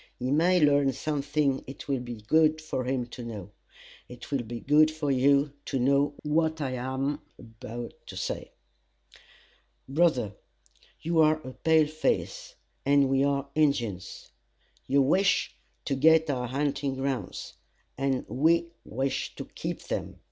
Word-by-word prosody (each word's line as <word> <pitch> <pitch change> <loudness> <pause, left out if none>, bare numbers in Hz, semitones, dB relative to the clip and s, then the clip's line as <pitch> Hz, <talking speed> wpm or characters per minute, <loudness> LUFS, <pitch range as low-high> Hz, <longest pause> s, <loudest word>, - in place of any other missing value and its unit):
He 125 +1 -2
may 175 +5 +4
learn 145 -3 +4
something 145 -2 -1
it 135 - -9
will 135 -2 0
be 120 -3 -7
good 155 +7 +3
for 155 -5 -3
him 130 -1 -1
to 120 - -8
know. 105 -4 -7 0.6
It 125 +3 -11
will 140 -3 +1
be 120 0 -6
good 150 +4 +5
for 155 -2 -2
you 140 +2 +3
to - - -2
know 140 +3 +2
what 160 +1 +1
I 135 -4 -2
am 130 +3 -2 0.2
about 115 +1 -8
to - - -8
say. - - -4 1.4
"Brother, 135 - +2 0.7
you 165 0 +1
are 155 0 +4
a 130 - -8
pale 160 +1 +3
face, 155 +1 -2 0.3
and 140 -1 +4
we 135 0 +3
are 140 0 0
Injins. 120 -11 -1 0.6
You 140 0 +4
wish 190 +8 +2 0.3
to - - -1
get 160 +3 +4
our 125 -2 -2
hunting 140 +1 -1
grounds, 135 -1 -4 0.4
and 135 -1 -1
we 170 +4 +2
wish 135 +4 -3
to - - -6
keep - - -6
them. - - -4
140 Hz, 145 wpm, -28 LUFS, 130-155 Hz, 1.4 s, good